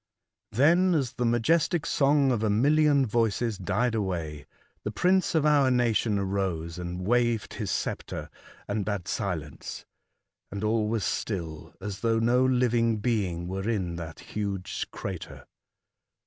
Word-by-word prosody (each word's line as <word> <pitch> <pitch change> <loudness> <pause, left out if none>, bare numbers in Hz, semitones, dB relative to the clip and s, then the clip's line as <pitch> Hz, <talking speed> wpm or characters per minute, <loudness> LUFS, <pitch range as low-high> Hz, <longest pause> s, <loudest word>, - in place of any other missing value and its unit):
Then, 170 - +4
as 135 -6 0
the 125 - 0
majestic 150 +7 +2
song 140 -1 +3
of 120 -4 0
a 110 - +1
million 140 +5 +4
voices 115 -1 0
died 120 +6 0
away, 85 -9 -3 0.4
the - - -2
prince 180 - +2
of 155 -2 +3
our 145 -3 +4
nation 120 -4 +2
arose 95 -4 -2
and 90 +1 -5
waved 120 0 +1
his - - -4
sceptre, - - -3 0.4
and 105 0 -1
bade 100 -3 -3
silence, 80 -7 -4 0.7
and 100 0 -4
all 110 0 +1
was 110 -4 -1
still 85 -8 -4
as 100 0 -5
though 115 +1 +1
no 120 +3 +3
living 120 -3 +2
being 100 -7 -1
were 95 +4 -3
in 95 -7 -1
that 80 -1 -7
huge 100 -3 -4
crater. - - -7
110 Hz, 140 wpm, -27 LUFS, 95-125 Hz, 0.7 s, Then